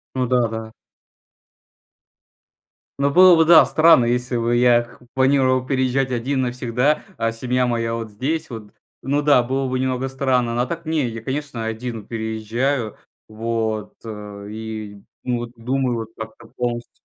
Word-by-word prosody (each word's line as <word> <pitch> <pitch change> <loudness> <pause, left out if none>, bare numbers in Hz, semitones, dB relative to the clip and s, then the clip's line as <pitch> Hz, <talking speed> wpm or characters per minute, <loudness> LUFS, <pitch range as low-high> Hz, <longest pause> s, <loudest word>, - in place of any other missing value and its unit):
Ну 130 -1 +1
да, 125 -1 +2
да. 110 0 -6 2.3
Ну 140 0 +2
было 185 +4 +8
бы, 160 - +5
да, 160 -1 +8
странно, 160 -4 +5
если 125 +1 -1
бы 120 0 +1
я 120 -1 +5
к 120 - -17 0.2
планировал 130 -1 +3
переезжать 130 0 0
один 130 +3 -1
навсегда, 125 +3 0 0.2
а 115 0 0
семья 125 +2 0
моя 115 -1 -1
вот 115 -2 -5
здесь 155 +9 -3
вот. 110 -4 -9 0.3
Ну 140 +3 0
да, 145 -3 +5
было 130 +2 -2
бы 130 0 -1
немного 130 0 -1
странно. 130 -3 0
Но 120 +1 +1
так 170 +5 -6
не, 155 -3 0
я, 115 -1 -6
конечно, 135 -2 -4
один 110 0 -5
переезжаю. 110 +2 -2 0.3
Вот, 110 -1 -3
э, 105 -2 -8
и, 110 -2 -7 0.2
ну, 125 -1 -1
вот 120 0 -6
думаю, 125 +2 -1
вот 110 - -5
как-то 110 0 -9
полностью. 120 -1 -3
125 Hz, 155 wpm, -21 LUFS, 115-130 Hz, 2.3 s, было